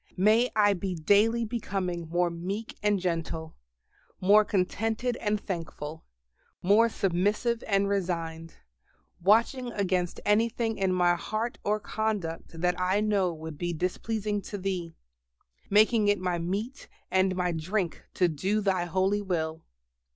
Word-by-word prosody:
May 220 +6 +4
I 205 -1 +5
be 185 0 -3
daily 210 +8 +3
becoming 190 -7 -3
more 175 +1 +1
meek 190 +6 -5
and 205 -1 +2
gentle, 165 -2 -3 0.6
more 205 +3 +6
contented 225 +5 -1
and 210 -1 0
thankful, 160 -5 -6 0.6
more 210 +5 +5
submissive 205 +5 0
and 200 -1 +2
resigned, 165 -4 -2 0.7
watching 235 +6 +3
against 185 -4 -1
anything 225 +1 +1
in 190 -1 +2
my 175 -1 +3
heart 215 +6 -3
or 210 +1 +1
conduct 200 -7 -3
that 180 +1 +1
I 185 +2 +2
know 205 -4 +1
would 160 -2 -8
be 175 -1 -1
displeasing 205 +5 -2
to 205 - -6
Thee, 180 -4 -3 0.7
making 215 +1 +4
it 205 0 +4
my 180 -2 -1
meat 205 +10 -4 0.2
and 190 0 +2
my 180 -1 0
drink 175 +2 -2
to 180 - +3
do 185 +7 0
Thy 190 -4 +1
holy 190 +3 +1
will. 160 -4 -2
195 Hz, 135 wpm, -28 LUFS, 175-215 Hz, 0.7 s, more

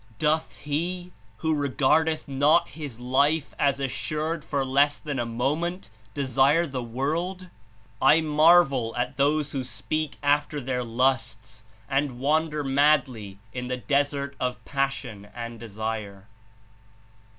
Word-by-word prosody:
"Doth 155 +3 0
he, 175 +5 -3 0.3
who 160 - +3
regardeth 150 +3 +1
not 145 +5 +3
his 140 -4 -8
life 140 +5 +1
(as 140 -1 +2
assured) 155 +4 -2
for 140 -2 -1
less 140 +2 +3
than 145 -4 -4
a 120 - -1
moment, 150 - -2 0.2
desire 140 +4 +3
the 135 -5 -4
world? 165 +10 -3 0.5
I 150 +4 +6
marvel 155 -6 +4
at 125 +2 -2
those 145 +1 +1
who 135 -2 -2
speak 155 +4 -3
after 145 +1 +1
their 125 -1 -2
lusts 115 -2 -1 0.2
and 135 -1 0
wander 150 +3 +1
madly 135 -7 +2 0.2
in 125 0 -4
the 125 0 -2
desert 140 +1 0
of 125 -1 -3
passion 135 -7 -3
and 115 -1 -6
desire." 110 -3 -5
140 Hz, 125 wpm, -26 LUFS, 125-155 Hz, 0.5 s, I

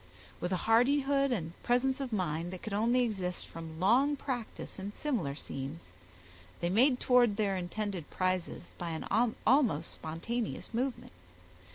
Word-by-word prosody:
With 175 - -2
a 185 - +2
hardihood 275 +4 +4
and 170 -8 -2
presence 260 +3 +2
of 265 -3 -3
mind 175 -4 -1
that 185 - -8
could 215 - -4
only 235 +5 +3
exist 190 -6 -2
from 160 -1 -8
long 255 +10 +4
practice 250 -7 -5
in 200 +2 -5
similar 210 - -1
scenes, 135 - -7 0.7
they 175 0 0
made 250 +5 +4
towards 245 -4 +4
their 200 -2 +1
intended 185 -1 -3
prizes, 185 -1 -2
by 170 -2 -3
an - - -6 0.4
almost 225 - +3
spontaneous 215 +11 -4
movement. 255 +2 -2
210 Hz, 145 wpm, -32 LUFS, 175-250 Hz, 0.7 s, hardihood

